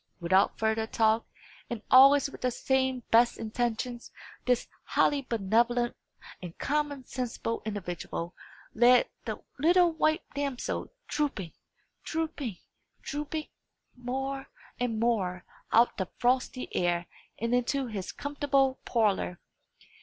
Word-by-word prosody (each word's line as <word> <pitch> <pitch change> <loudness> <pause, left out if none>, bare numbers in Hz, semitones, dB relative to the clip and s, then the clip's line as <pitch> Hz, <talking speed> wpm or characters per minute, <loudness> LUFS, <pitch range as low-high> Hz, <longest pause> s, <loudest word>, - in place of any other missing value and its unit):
Without 185 +3 +3
further 220 0 0
talk, 220 0 +2 0.4
and 230 -3 -5
always 275 +2 +8
with 275 - -11
the 255 - +2
same 260 0 0
best 235 +1 +5
intentions, 235 +2 -3 0.4
this 250 -1 +2 0.2
highly 290 -1 +2
benevolent 235 +1 +1 0.5
and 175 -2 -8
common 290 -2 -1
sensible 240 -2 -3
individual 175 -3 -4 0.4
led 245 +2 +6 0.2
the - - -3 0.2
little 345 +3 +5
white 315 +1 +1
damsel 280 -3 -2 0.2
drooping, 215 - -2 0.5
drooping, 305 - -3 0.5
drooping, 300 +1 -4 0.5
more 270 +2 -4 0.3
and 235 -3 -1
more 195 -6 0 0.3
out 235 +2 +5
of - - -35
the 190 -2 -2
frosty 255 +1 0
air, 175 -1 +1 0.3
and 230 +2 -1
into 260 +3 +1
his 210 -6 -5
comfortable 275 -2 0
parlour. 205 -6 +1
245 Hz, 115 wpm, -29 LUFS, 220-275 Hz, 0.5 s, always